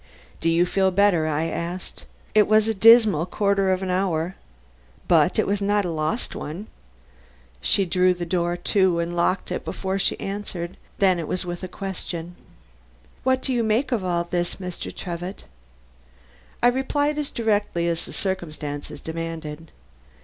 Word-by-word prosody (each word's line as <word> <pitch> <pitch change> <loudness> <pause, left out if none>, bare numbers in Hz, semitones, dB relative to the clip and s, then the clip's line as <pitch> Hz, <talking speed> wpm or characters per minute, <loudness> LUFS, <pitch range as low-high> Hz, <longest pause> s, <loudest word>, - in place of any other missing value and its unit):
"Do 165 - +1
you 170 +1 +4
feel 190 +1 +2
better?" 185 -4 +3
I 155 +1 0
asked. 170 +2 -5 0.3
"It 215 -1 +5
was 215 0 +4
a 225 - +2
dismal 220 -5 +6
quarter 200 0 +2
of 185 0 0
an 185 - -1
hour. 180 -2 0 0.7
But - - +4
it - - +3
was 200 0 0
not 205 0 +2
a 175 - -2
lost 155 +7 -2
one." 165 +8 -6 1.0
She 195 - +2
drew 180 +1 +3
the 175 0 -4
door 175 0 0
to 190 -1 +2
and 170 +1 -2
locked 175 +2 0
it - - -2
before 190 0 -3
she - - +1
answered; 195 -3 -5 0.2
then 185 -3 +3
it 160 - -4
was 185 - -2
with 175 0 -5
a 185 - -4
question. 180 -2 -6 0.9
"What 260 0 +1
do 265 - 0
you 240 - +2
make 225 +6 +1
of 225 -6 0
all 175 -2 0
this, 175 0 -2
Mr. 180 -2 -6
Trevitt?" 175 +2 -6 1.2
I - - +7
replied 285 +4 0
as 295 - -2
directly 205 -6 0
as 165 -1 -1
the - - -10
circumstances 155 -6 -4
demanded. 160 -1 -6
185 Hz, 165 wpm, -24 LUFS, 170-205 Hz, 1.2 s, I